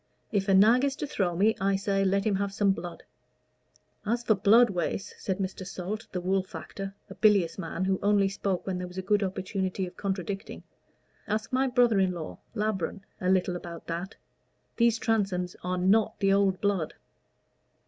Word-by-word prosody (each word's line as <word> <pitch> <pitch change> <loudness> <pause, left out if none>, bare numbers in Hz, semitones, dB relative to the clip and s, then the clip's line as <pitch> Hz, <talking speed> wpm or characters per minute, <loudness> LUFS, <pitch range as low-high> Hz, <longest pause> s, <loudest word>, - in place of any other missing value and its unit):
If 200 -2 0
a 195 - +5
nag 225 +6 +6
is 275 -1 +1
to 300 - -3
throw 185 -10 -1
me, 210 +5 +3
I 195 0 +2
say, 195 0 0
let 195 +1 +1
him 205 -3 +2
have 200 0 -1
some 200 0 +2
blood." 175 -2 -6 1.0
"As 235 +3 -1
for 220 - +4
blood, 220 +3 +5
Wace," 195 +3 -3
said 190 -2 -2
Mr. 190 -1 -4
Salt, 195 +3 -5
the 180 - -2
wool 190 +2 +1
factor, 195 +1 -7
a 190 - -9
bilious 195 -5 +3
man, 170 +3 -3
who 190 0 +1
only 205 -1 +3
spoke 195 -1 -2
when 185 -2 -2
there 180 - -4
was 180 +1 -12
a 190 - -3
good 205 +2 +2
opportunity 190 0 -2
of 180 - -11
contradicting, 195 0 -4 0.6
"ask 215 +4 -2
my 265 +1 +3
brother 245 -4 +3
in 190 -1 +2
law, 165 -3 -7 0.2
Labron, 210 -3 -2 0.2
a 185 - 0
little 185 -1 +2
about 170 -1 -8
that. 175 +4 -5 0.6
These 235 -1 +4
Transomes 195 -6 0
are 180 +1 -1
not 200 +4 +2
the 195 -1 +3
old 195 -2 +2
blood." 200 -6 0
195 Hz, 185 wpm, -28 LUFS, 185-210 Hz, 1.0 s, nag